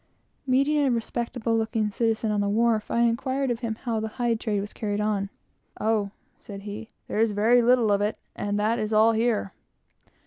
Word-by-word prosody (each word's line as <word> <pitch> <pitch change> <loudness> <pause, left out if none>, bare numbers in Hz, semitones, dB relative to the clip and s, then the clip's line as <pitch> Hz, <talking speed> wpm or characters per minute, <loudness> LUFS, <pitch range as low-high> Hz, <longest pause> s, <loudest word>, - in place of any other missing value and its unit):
Meeting 275 +4 +3
a 280 -2 +3
respectable 235 0 -1
looking 220 -1 0
citizen 225 0 0
on 205 -1 +1
the 200 - 0
wharf, 220 0 +1
I 235 - +1
inquired 260 +3 +1
of 235 - -2
him 230 -2 -3
how 230 -1 -3
the 220 - -2
hide 240 -2 +1
trade 210 -3 -1
was 205 +1 -6
carried 205 -2 -2
on. 210 -2 0 0.5
"O," 215 -2 +1 0.3
said 200 -2 -9
he, 205 +2 -7 0.2
"there - - -2
is 225 -1 +2
very 225 +4 +4
little 240 -2 +4
of 200 0 +2
it, 210 +1 -1 0.2
and 205 0 -2
that 220 +3 +1
is 215 +1 -2
all 220 +1 +5
here. 225 -3 0
220 Hz, 195 wpm, -26 LUFS, 210-235 Hz, 0.5 s, all